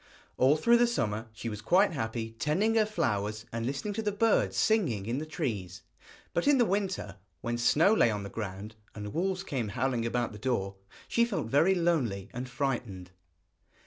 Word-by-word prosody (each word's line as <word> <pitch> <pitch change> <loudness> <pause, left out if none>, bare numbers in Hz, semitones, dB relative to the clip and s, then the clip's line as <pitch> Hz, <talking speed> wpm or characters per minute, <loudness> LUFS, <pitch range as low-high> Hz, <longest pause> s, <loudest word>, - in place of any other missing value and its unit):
All 135 +4 +4
through 235 +10 +5
the 240 0 +4
summer 110 - -1
she 110 +1 -7
was 105 -2 -5
quite 185 - +4
happy 115 -5 -3
tending 190 - +1
her 220 -2 +3
flowers 110 - -1
and 115 0 -3
listening 140 +10 -3
to 225 - -2
the 210 -1 0
birds 215 +2 +2
singing 155 - +2
in 120 +5 -1
the 155 - -5
trees, 100 - -4 0.5
but 170 - 0
in 290 -1 +6
the 240 - +4
winter, 195 - -2 0.2
when 120 0 -2
snow 160 - +4
lay 170 - +4
on 105 -2 -2
the 100 - -6
ground 105 0 -6 0.2
and 105 -1 -6
wolves 190 +2 -1
came 130 - -2
howling 120 +1 -1
about 120 0 -1
the 105 - -10
door, 100 -6 -1 0.3
she 235 - +2
felt 205 - -2
very 160 +9 +4
lonely 130 - 0
and 125 +1 -5
frightened. 120 -9 -3
125 Hz, 185 wpm, -29 LUFS, -, 0.5 s, in